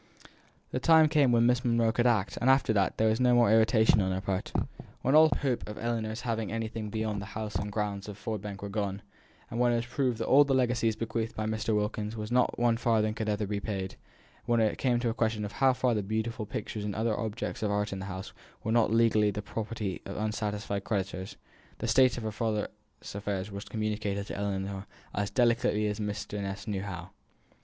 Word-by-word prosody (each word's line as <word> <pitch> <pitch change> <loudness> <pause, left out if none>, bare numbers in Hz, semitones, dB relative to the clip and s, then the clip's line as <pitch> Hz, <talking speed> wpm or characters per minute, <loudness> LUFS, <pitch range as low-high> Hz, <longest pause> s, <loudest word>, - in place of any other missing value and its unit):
The 130 - -1
time 160 +2 +6
came 145 -5 +4
when 120 0 +4
Miss 125 +1 +3
Monro 115 -2 +2
could 120 +2 +2
act; 110 -6 +1
and 125 - +3
after 135 -4 +4
that, 100 -3 +1
there 110 - +3
was 110 +2 +1
no 125 -1 +4
more 120 -3 +5
irritation 110 -1 +5
on 95 0 0
her 95 - -1
part. 95 -1 -3 0.5
When 135 - +2
all 155 +1 +8
hope 125 -5 -1
of 105 - -7
Ellinor's 115 -1 -2
having 115 -3 -2
anything 110 -1 -3
beyond 110 -1 -2
the 100 - -7
house 110 -1 -4
and 105 +3 -2
grounds 100 -1 -3
of 100 - -8
Ford 110 -1 -4
Bank 100 -1 -7
was 100 - -5
gone; 100 -2 -2 0.5
when 120 +1 +2
it - - +2
was 115 0 -1
proved 125 -1 0
that 115 - -2
all 145 +2 +7
the 140 -2 +1
legacies 120 -3 +2
bequeathed 115 +1 -3
by 110 - -2
Mr. 110 0 0
Wilkins 105 +1 -2 0.2
not 125 0 +2
one 120 -1 +2
farthing 110 -3 +2
could 110 -1 -3
ever 105 0 0
be 100 0 -2
paid; 95 -3 -4 0.5
when 120 0 +2
it 110 -2 +1
came 125 -3 +2
to - - -3
be 115 - +2
a - - -3
question 110 -1 0
how 130 +6 +2
far 125 -1 +1
the 105 - 0
beautiful 110 +2 -3
pictures 105 +1 -4
and 105 -1 -3
other 110 0 0
objects 110 +1 -4
of 105 - 0
art 105 0 0
in 95 - -4
the 95 - -5
house 95 -1 -6 0.3
were 110 - -1
not 115 -2 +3
legally 110 -2 +4
the 105 0 -4
property 105 -2 -4
of 100 - -6
unsatisfied 105 -1 -2
creditors, 95 -3 -3 0.4
the - - -3
state 130 -2 +4
of 120 - -5
her 110 - -2
father's 105 -1 -1 0.4
affairs 100 0 -3
was 100 +1 -6
communicated 105 -2 -2
to - - -6
Ellinor 100 -1 -3 0.3
as 100 0 -1
delicately 115 -1 +2
as 105 0 -2
Mr. 105 0 -3
Ness 100 +2 -5
knew 100 -3 -2
how. 95 -2 -6
110 Hz, 215 wpm, -29 LUFS, 100-115 Hz, 0.5 s, all